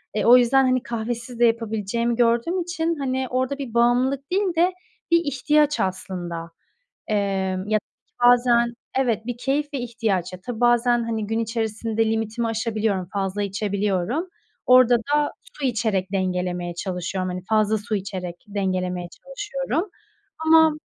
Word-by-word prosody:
Eee, 210 - 0
o 245 +2 +9
yüzden, 260 +2 +4
hani, 255 -1 +2
kahvesiz 235 +1 -4
de 240 - +6
yapabileceğimi 230 0 0
gördüğüm 240 +10 +2
için, 335 -1 -1
hani, 260 -1 -1
orada 260 +2 -1
bir 260 -5 -6
bağımlılık 255 +4 +2
değil 380 -2 +1
de 360 +2 +3 0.4
bir 335 - +6
ihtiyaç 295 +2 +2
aslında. 175 -3 -3 0.6
Emm, 195 -2 -1
ya 215 0 +3
da 230 - -20
bazen 240 -1 +4 0.2
Evet, 230 -4 0
bir 245 -1 -3
keyif 280 +4 0
ve - - 0
ihtiyaç. 225 -7 -1 0.2
Tabii 245 -2 -5
bazen, 240 0 +3
hani, 225 -2 -2
gün 225 +2 -1
içerisinde 225 0 -1
limitimi 225 +1 -1
aşabiliyorum, 215 -4 -1
fazla 195 0 -1
içebiliyorum. 200 - -1 0.4
Orada 250 -1 +7
da 290 +5 0 0.3
su 285 - -4
içerek 215 -6 -1
dengelemeye 180 -2 -1
çalışıyorum. 185 0 -3
Hani, 180 0 -5
fazla 215 0 +2
su 210 +1 -4
içerek 185 -3 -5
dengelemeye 185 -3 -2
çalışıyorum. 270 - -4 0.6
Ama, 320 -1 +6
230 Hz, 140 wpm, -23 LUFS, 195-255 Hz, 0.6 s, o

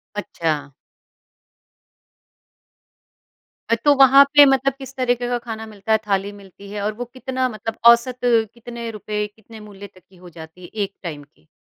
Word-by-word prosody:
अच्छा। 155 -8 -3 3.0
अ, 230 - +4
तो 290 - +6
वहाँ 270 +1 +8
पे 290 -1 +10
मतलब 270 0 +2
किस 270 0 -11
तरीके 245 -1 0
का 245 - 0
खाना 225 -2 -7
मिलता 215 0 -7
है, 220 - +5
थाली 200 0 0
मिलती 200 0 -14
है 205 -1 -5
और 210 +1 -1
वो 245 +3 -6
कितना 260 0 -2
मतलब 225 0 -6
औसत 250 +1 0 0.3
कितने 235 0 -8
रुपए, 210 -1 -4
कितने 220 0 -14
मूल्य 205 -1 -11
तक 185 -1 -22
की 190 - -21
हो 180 0 -14
जाती 160 +1 -13
है 175 - -9 0.2
एक 200 0 -6
टाइम 150 -5 -6
की? 80 - -28
220 Hz, 165 wpm, -21 LUFS, 195-245 Hz, 3.0 s, पे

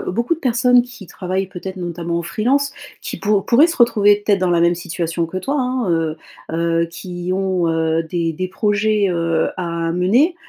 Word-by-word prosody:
beaucoup 235 - -1
de 330 - -15
personnes 245 0 +4
qui 240 -6 -12
travaillent, 185 +2 -3
peut-être 190 +1 -7
notamment 170 -1 -3
en - - -3
freelance, 260 +10 0 0.3
qui - - -5
pou 205 -1 +1
pourraient 260 +10 +4
se 340 - -3
retrouver 205 -4 +4
peut-être 200 -3 +3
dans 185 - +1
la 170 - +3
même 170 +1 +4
situation 170 -1 -3
que 185 - -7
toi, 270 +10 -2
hein, 250 -4 -1
heu 165 -2 0 0.3
heu, 165 0 +1
qui 175 +1 -6
ont, 185 -3 0
heu, 160 0 +1
des 165 0 -2
des 185 +3 -4
projets, 210 +1 +1
heu, 165 -2 0
à 170 -2 -2
mener, 235 - +3
185 Hz, 190 wpm, -19 LUFS, 170-215 Hz, 0.3 s, personnes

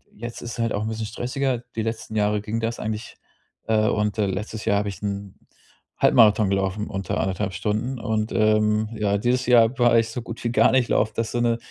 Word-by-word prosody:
jetzt 120 +2 -7
ist 120 - -6
es - - -9
halt 115 -1 0
auch 100 - -1
'n - - -2
bisschen 110 0 -3
stressiger. 125 +3 -2 0.2
Die 115 - -1
letzten 110 -1 -4
Jahre 105 -1 +1
ging 110 +2 -3
das 115 +1 -3
eigentlich, 110 +1 -5 0.5
äh 110 -1 +2
und, 105 0 0
äh, 105 - +2
letztes 105 +3 -4
Jahr 100 -2 +3
hab 105 - -2
ich 100 -3 -6
'n 100 -1 -4 0.6
Halbmarathon 105 -3 +5
gelaufen 100 +2 -1
unter 95 -3 -3
anderthalb 95 0 -2
Stunden 110 +6 -2
und, 110 -1 -1
ähm, 105 0 +2
ja, 100 -1 +1
dieses 125 +3 +1
Jahr 120 +1 +4
war 120 -1 +5
ich 115 0 -1
so 120 +1 -5
gut 115 +1 -8
wie 120 - 0
gar - - +4
nicht 130 -2 +2
laufen. 110 +1 +1
Das 115 -1 -1
ist - - -8
so, 120 - 0
ne, 115 -1 +2
110 Hz, 225 wpm, -23 LUFS, 105-115 Hz, 0.6 s, Halbmarathon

